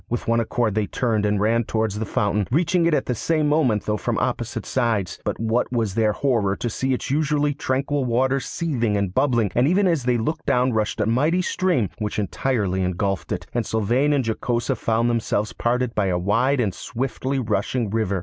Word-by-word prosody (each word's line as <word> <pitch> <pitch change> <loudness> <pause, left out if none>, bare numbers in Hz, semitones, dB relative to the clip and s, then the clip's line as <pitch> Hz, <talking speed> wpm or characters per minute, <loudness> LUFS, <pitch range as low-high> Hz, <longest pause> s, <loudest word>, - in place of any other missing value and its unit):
With 120 - -3
one 115 0 +3
accord 115 -1 0
they 105 -1 0
turned 110 -4 0
and 105 -1 +1
ran 115 +3 +2
towards 110 -2 -1
the 110 - -3
fountain, 105 -1 0
reaching 170 +4 +2
it 170 - +2
at - - 0
the 125 - -1
same 155 +6 0
moment, 140 -9 +2
though 105 0 0
from - - -2
opposite - - -2
sides. 110 -9 -1
But - - -3
what 115 +3 0
was 115 -5 0
their 110 0 +2
horror 110 -6 +1
to 120 - -3
see 130 +5 -1
its 125 - -5
usually 150 0 +1
tranquil 135 +1 -1
waters 130 +2 +1
seething 120 -11 -1
and 100 -3 -1
bubbling, 120 -6 +2
and 125 +3 +3
even 190 +5 +3
as 165 -8 +1
they 125 -1 +2
looked 155 +8 -3
down 125 -2 +2
rushed 110 0 -1
a - - +2
mighty 150 - +2
stream, 175 - 0
which 105 -2 -3
entirely 105 -2 -1
engulfed 95 +2 -2
it, 90 0 -3
and 120 - 0
Sylvain 120 +7 +1
and 140 -4 +1
Jocosa 120 +3 -1
found 115 +1 0
themselves 110 -3 -1
parted 125 0 0
by 105 -2 +1
a 90 -1 +1
wide 115 +10 +1
and 105 -6 0
swiftly 130 +5 -3
rushing 110 -1 -1
river. 105 -4 0
115 Hz, 205 wpm, -23 LUFS, 105-135 Hz, -, one